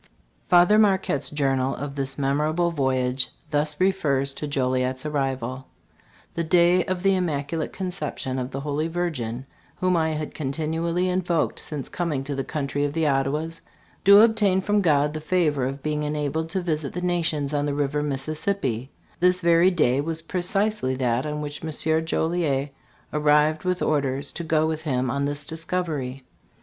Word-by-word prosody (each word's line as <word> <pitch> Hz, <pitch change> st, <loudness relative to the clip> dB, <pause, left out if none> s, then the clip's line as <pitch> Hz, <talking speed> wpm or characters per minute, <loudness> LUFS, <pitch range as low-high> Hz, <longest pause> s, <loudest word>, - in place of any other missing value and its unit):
Father 180 Hz, +4 st, +6 dB
Marquette's 190 Hz, -9 st, +2 dB
journal 135 Hz, -2 st, 0 dB
of 140 Hz, 0 st, -5 dB
this 135 Hz, -1 st, -2 dB
memorable 150 Hz, +5 st, +1 dB
voyage 130 Hz, -3 st, +1 dB, 0.2 s
thus 150 Hz, 0 st, 0 dB
refers 140 Hz, -8 st, +1 dB
to 150 Hz, -, -5 dB
Joliet's 130 Hz, -1 st, -1 dB
arrival: 135 Hz, -3 st, -2 dB, 0.7 s
"The 170 Hz, -, -1 dB
day 175 Hz, +2 st, +4 dB
of 185 Hz, -1 st, -3 dB
the 195 Hz, 0 st, +4 dB
Immaculate 160 Hz, -3 st, -2 dB
Conception 155 Hz, -8 st, -4 dB
of 125 Hz, 0 st, -3 dB
the 135 Hz, +1 st, -5 dB
Holy 150 Hz, +2 st, -1 dB
Virgin, 140 Hz, -8 st, -3 dB, 0.3 s
whom 185 Hz, 0 st, +1 dB
I 160 Hz, -1 st, +1 dB
had 155 Hz, 0 st, -4 dB
continually 160 Hz, +5 st, -1 dB
invoked 180 Hz, -2 st, 0 dB
since 145 Hz, -4 st, -5 dB
coming 155 Hz, -6 st, -2 dB
to 140 Hz, +1 st, -4 dB
the 135 Hz, 0 st, -2 dB
country 145 Hz, 0 st, -2 dB
of 145 Hz, 0 st, -1 dB
the 165 Hz, 0 st, 0 dB
Ottawas, 150 Hz, +4 st, 0 dB, 0.4 s
to 200 Hz, +2 st, +9 dB
ob 225 Hz, -1 st, +4 dB
tain 195 Hz, -3 st, +3 dB
from 205 Hz, +2 st, +1 dB
God 150 Hz, -4 st, +2 dB
the 155 Hz, -, -5 dB
favor 150 Hz, -6 st, +1 dB
of 135 Hz, +1 st, -6 dB
being 150 Hz, -1 st, -1 dB
enabled 150 Hz, +1 st, -2 dB
to 190 Hz, +3 st, -1 dB
visit 155 Hz, -5 st, -2 dB
the 180 Hz, -, -4 dB
nations 165 Hz, -5 st, 0 dB
on 145 Hz, 0 st, 0 dB
the 145 Hz, -, -1 dB
river 145 Hz, 0 st, 0 dB
Mississippi 140 Hz, -, -2 dB, 0.3 s
this 180 Hz, +1 st, +3 dB
very 170 Hz, +1 st, +5 dB
day 140 Hz, -7 st, +2 dB
was 160 Hz, +1 st, -4 dB
precisely 185 Hz, -4 st, 0 dB
that 125 Hz, +1 st, 0 dB
on 150 Hz, 0 st, -3 dB
which 145 Hz, +1 st, -6 dB
M. 160 Hz, 0 st, 0 dB
Joliet 160 Hz, -4 st, 0 dB, 0.4 s
arrived 150 Hz, +2 st, +3 dB
with 180 Hz, 0 st, 0 dB
orders 140 Hz, -1 st, 0 dB
to 170 Hz, -, -5 dB
go 155 Hz, -1 st, +2 dB
with 160 Hz, 0 st, -2 dB
him 130 Hz, -5 st, -1 dB
on 140 Hz, +1 st, -1 dB
this 145 Hz, 0 st, -3 dB
discovery. 160 Hz, -6 st, -3 dB
150 Hz, 165 wpm, -24 LUFS, 140-170 Hz, 0.7 s, to